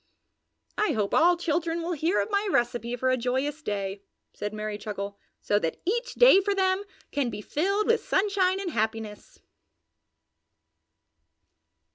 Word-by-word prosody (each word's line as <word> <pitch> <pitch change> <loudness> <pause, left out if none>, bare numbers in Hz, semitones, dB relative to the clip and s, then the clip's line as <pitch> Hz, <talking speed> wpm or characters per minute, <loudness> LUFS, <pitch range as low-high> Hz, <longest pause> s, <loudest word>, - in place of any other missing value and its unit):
"I 425 - +2
hope 210 -3 -1
all 350 +2 +5
children 335 0 -1
will 345 - -2
hear 335 +3 +1
of - - -4
my 405 0 +1
recipe 240 -2 0
for 255 +1 +1
a 255 - +2
joyous 265 +5 -1
day," 200 -5 -3 0.3
said 210 0 -4
Merry 215 -1 -4
Chuckle, 200 -1 -5 0.2
"so 205 - +2
that 165 -5 -3
each 475 +6 -1
day - - +7
for 400 +1 0
them 380 0 +1 0.3
can 280 -4 0
be - - -6
filled 395 - 0
with 460 +1 +2
sunshine 385 -1 +1
and 380 -3 -3
happiness!" 220 -3 -3
295 Hz, 145 wpm, -27 LUFS, -, 0.3 s, day